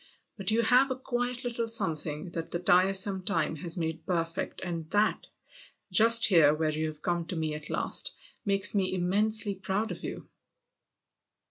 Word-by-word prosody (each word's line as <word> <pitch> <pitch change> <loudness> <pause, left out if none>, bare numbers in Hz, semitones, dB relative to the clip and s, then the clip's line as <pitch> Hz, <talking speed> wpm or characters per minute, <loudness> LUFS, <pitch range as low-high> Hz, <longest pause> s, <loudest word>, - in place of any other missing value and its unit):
But 195 -3 -1
you've 225 +2 +1
a 260 +1 +4
quiet 245 -1 -3
little 235 -1 -3
something 165 -6 -1
that 165 -1 -5
the - - -2
tiresome 190 +2 +3
time 160 -3 -1
has 170 +3 -1
made 160 -1 -4
perfect, 165 -1 -3
and 165 -3 -5
that 210 +2 0 0.6
just 230 +4 +7
here 160 -6 +5
where 155 0 -1
you've 155 0 -4
come 175 -1 -1
to 180 - -2
me 160 -2 -2
at 150 0 -8
last - - -2 0.3
makes 200 -1 +3
me 190 -2 0
immensely 205 +4 +1
proud 195 +3 -3
of - - -8
you - - -7
185 Hz, 155 wpm, -28 LUFS, 165-220 Hz, 0.6 s, just